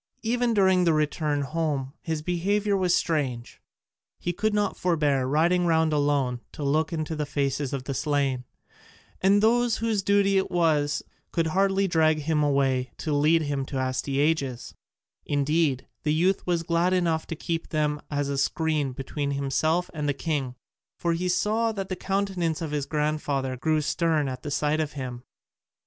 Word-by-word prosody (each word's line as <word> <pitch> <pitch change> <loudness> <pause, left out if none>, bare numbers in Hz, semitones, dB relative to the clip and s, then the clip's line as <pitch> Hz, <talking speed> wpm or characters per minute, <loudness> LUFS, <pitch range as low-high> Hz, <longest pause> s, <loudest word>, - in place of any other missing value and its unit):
Even 240 0 +1
during 190 -2 +4
the 165 -2 +3
return 150 -1 0
home 140 -3 -2
his 160 -2 -3
behaviour 200 +4 0
was 185 -2 +2
strange; 130 -7 -2 0.6
he 175 - -3
could 215 +5 0
not 210 -1 0
forbear 150 -7 +1
riding 170 +5 +2
round 160 -1 +3
alone 145 -4 +1
to 150 - -6
look 155 +4 +1
into 160 -1 -3
the 150 - -1
faces 140 -1 -1
of 135 -2 -3
the 135 - -4
slain, 140 -2 0 0.8
and 200 +2 +4
those 240 0 +3
whose 225 -3 0
duty 200 0 +3
it 190 - -2
was 150 -4 +1 0.3
could 165 - +1
hardly 195 +3 +2
drag 160 -3 +3
him 150 0 +1
away 135 -3 +1
to 155 - -2
lead 155 +3 +3
him 145 -2 -2
to 135 0 -5
Astyages: 135 0 -1 0.5
indeed, 145 -1 0
the 150 - 0
youth 185 +4 +1
was 170 -2 +1
glad 170 +2 +1
enough 170 -3 +1
to 165 - -4
keep 165 +1 -3
them 150 -1 0
as 145 -1 -1
a 140 -1 -1
screen 155 -2 0
between 140 +2 -4
himself 140 +5 0
and 150 -2 -2
the 140 - 0
king, 140 -6 -2 0.4
for 170 -1 0
he 180 +2 -1
saw 220 +5 +1
that 195 -2 -5
the 185 - -2
countenance 190 -4 -1
of 160 -3 -4
his 145 -2 -2
grandfather 150 -3 -1
grew 155 +4 +1
stern 155 0 +1
at 130 -1 -5
the 145 - -5
sight 150 +2 0
of 155 -2 -2
him. 125 -4 -6
155 Hz, 170 wpm, -26 LUFS, 140-175 Hz, 0.8 s, during